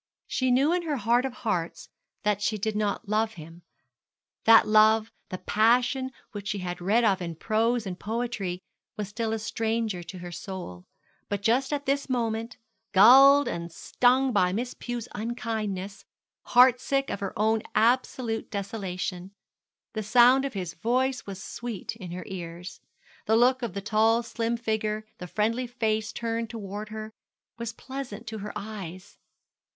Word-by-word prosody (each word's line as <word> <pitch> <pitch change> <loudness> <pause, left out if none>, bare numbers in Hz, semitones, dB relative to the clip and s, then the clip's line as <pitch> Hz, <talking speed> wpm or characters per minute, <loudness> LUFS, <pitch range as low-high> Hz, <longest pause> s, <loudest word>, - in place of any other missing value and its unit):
She 260 -1 0
knew 270 +6 +4
in 355 - +1
her 315 -4 -2
heart 240 +3 +2
of 265 - -2
hearts 170 -9 -3 0.4
that 210 -1 +1
she 215 +1 0
did 215 +1 -2
not 210 -1 -1
love 215 +2 +1
him 165 +1 -11 0.8
that 225 0 +7
love 215 +1 +5 0.2
the 185 - -4
passion 245 +6 +2 0.2
which 205 -2 -7
she 200 - -1
had 180 -2 -5
read 215 +7 +3
of 195 -4 +2
in 170 -2 -4
prose 225 +5 0
and 185 -2 -5
poetry 220 -5 -3 0.4
was 210 -2 -4
still 225 +1 -2
a 225 - 0
stranger 220 -3 -2
to 185 +2 -9
her 175 0 -8
soul: 175 - -7 0.4
but 205 -1 -2
just 255 +5 +2
at 285 -1 -2
this 280 +1 0
moment, 230 -2 -2 0.4
galled 270 +8 +8
and 170 0 -4
stung 255 +8 +2
by 180 -3 +3
Miss 240 +6 -3
Pew's 240 -2 -5
unkindness, 210 -3 -4 0.4
heart 250 0 +6
sick 275 0 0
at - - -3
her 200 -1 -5
own 220 +1 +2
absolute 235 0 +1
desolation, 190 -3 -4 0.6
the 215 - -2
sound 245 +5 +5
of 275 - -4
his 180 -4 -4
voice 250 +7 0
was 190 -1 -7
sweet 235 -3 -5
in 190 -6 -9
her 180 +1 -6
ears, 175 -1 -8 0.5
the 220 - +4
look 255 +2 +4
of 235 -6 -3
the 200 - -3
tall 220 +3 +3
slim 230 0 -2
figure, 215 -1 -2
the 180 - -6
friendly 230 +6 0
face 220 -3 -1
turned 230 -1 -3
towards 210 -1 -6
her, 215 0 -7 0.5
was 235 -1 -3
pleasant 245 -3 -7
to 220 -1 -6
her 210 +1 -5
eyes. 200 -3 -8
220 Hz, 160 wpm, -27 LUFS, 200-240 Hz, 0.8 s, galled